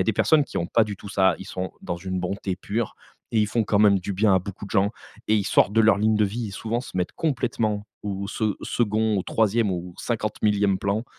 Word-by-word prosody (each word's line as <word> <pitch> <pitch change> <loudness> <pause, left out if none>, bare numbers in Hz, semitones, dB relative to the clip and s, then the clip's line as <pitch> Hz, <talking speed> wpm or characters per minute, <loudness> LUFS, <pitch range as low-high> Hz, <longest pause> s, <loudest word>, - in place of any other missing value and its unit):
a - - +2
des 110 - +2
personnes 150 +8 +4
qui - - -5
ont 85 - -1
pas 115 +5 +3
du 105 -2 -3
tout 100 - -10
ça. 95 -2 +3
Ils 95 - -9
sont 95 -2 -4
dans 85 -1 -3
une 95 +1 -4
bonté 95 +1 -3
pure 105 +3 -3 0.3
et 115 - +1
ils 105 - +3
font 110 +2 0
quand 100 - +1
même 100 -2 +5
du 100 +2 -4
bien 100 +1 +3
à - - +5
beaucoup 100 +2 -8
de 100 - -11
gens 100 -1 +2 0.4
et 110 - +4
ils 100 - 0
sortent 105 0 +3
de 115 - +4
leur 110 -2 +5
ligne 110 +1 +2
de 105 - +3
vie 110 +2 -3
et - - -7
souvent 115 +4 -3
se 120 - -9
mettent 90 -1 -1
complètement 115 -8 -1 0.2
au 100 -1 -4
se 105 0 -1
second, 110 -1 0
au 95 - 0
3e 110 -1 +1
ou 90 0 -4
au - - -22
50000e 105 -3 0
plan, 100 +4 -1
105 Hz, 255 wpm, -24 LUFS, 95-110 Hz, 0.4 s, même